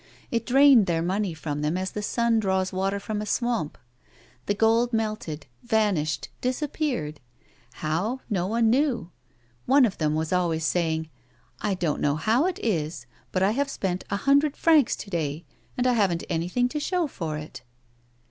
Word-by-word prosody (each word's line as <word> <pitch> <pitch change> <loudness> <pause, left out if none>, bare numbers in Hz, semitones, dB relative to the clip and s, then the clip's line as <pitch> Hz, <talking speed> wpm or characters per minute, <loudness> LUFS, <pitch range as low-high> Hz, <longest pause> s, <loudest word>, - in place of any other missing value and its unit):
It 230 -1 -1
drained 265 -4 +6
their 165 -1 +1
money 190 0 -1
from 150 -2 -4
them 150 +4 0
as 185 0 -3
the 210 - -4
sun 235 +2 +1
draws 190 -2 0
water 195 +2 -1
from 210 +1 -4
a - - -4
swamp. 235 - -1 0.7
The 205 - +1
gold 230 +3 +3
melted, 215 -9 -2 0.2
vanished, 205 -9 0
disappeared. 255 - -2 0.5
How'? 180 - -2
No 185 -5 -1
one 225 +1 +2
knew. 250 - +1 0.6
One 270 0 +6
of 205 - -3
them 155 -1 +1
was 160 +2 -1
always 165 -3 +1
saying: 160 -1 0 0.2
" - - -36
I 205 -2 0
don't 170 -4 -1
know 145 0 +2
how 225 - +2
it 370 - -2
is, 160 - -1 0.3
but 185 - +1
I 195 - +4
have 275 +4 0
spent 185 -8 -2
a 200 - 0
hundred 280 +5 +3
francs 310 -6 +4
to 200 - -9
day, 160 -1 -2 0.3
and 250 - +1
I 250 - +4
haven't 190 -7 +1
anything 180 +10 +1
to 300 - -3
show 355 +3 0
for 165 - -4
it." 150 -2 -8
200 Hz, 175 wpm, -26 LUFS, 165-240 Hz, 0.7 s, drained